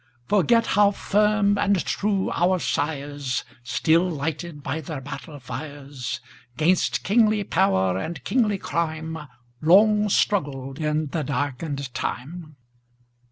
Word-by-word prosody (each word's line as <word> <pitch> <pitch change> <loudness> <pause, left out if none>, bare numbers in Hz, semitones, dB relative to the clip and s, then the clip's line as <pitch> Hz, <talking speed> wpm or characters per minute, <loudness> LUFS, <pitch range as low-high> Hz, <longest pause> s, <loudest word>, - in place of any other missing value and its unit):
Forget 230 - +3
how 205 0 +6
firm 205 0 +2
and 200 -3 +2
true 200 -2 0
our 185 +2 +2
sires, 145 -4 -2 0.2
Still 165 +8 +2
lighted 155 0 -4
by 160 - -3
their 150 -1 -5
battle 145 +2 -8
fires,'Gainst 135 +3 -3
kingly 215 0 +3
power 95 - +2
and 165 - -5
kingly 220 -6 +1
crime, 160 -1 -2 0.5
Long 210 +5 +5
struggled 140 -10 0
in 155 -1 0
the 155 +1 -2
darkened 140 -1 -3
time? 155 +4 -5
160 Hz, 110 wpm, -24 LUFS, 140-195 Hz, 0.5 s, how